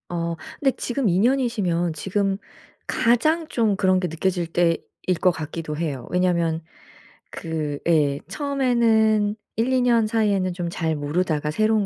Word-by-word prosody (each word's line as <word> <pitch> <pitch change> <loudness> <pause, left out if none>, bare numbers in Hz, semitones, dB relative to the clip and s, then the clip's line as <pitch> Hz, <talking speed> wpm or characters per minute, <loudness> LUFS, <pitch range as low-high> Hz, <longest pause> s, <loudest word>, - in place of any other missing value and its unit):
어 170 -1 -2 0.2
근데 270 -3 +2
지금 250 0 -1
2 175 +1 +2
년이시면 210 -9 +1
지금 195 +4 -1 0.5
가장 310 +8 +2
좀 220 -7 +1
그런 185 -2 +2
게 180 - -1
느껴질 175 +1 -1
때일 170 0 +1 0.4
것 185 - +6
같기도 155 -1 -5
해요. 145 -7 -3
왜냐하면 170 -3 +1 0.7
그 155 -3 -4
예 145 -4 +3
처음에는 225 -5 +2 0.2
1-2 255 +3 +2
년 235 -3 +3
사이에는 205 -4 +1
좀 175 -1 -3
잘 160 -2 -1
모르다가 150 0 -1
새로운 215 +4 +2
185 Hz, 265 characters per minute, -23 LUFS, 165-225 Hz, 0.7 s, 것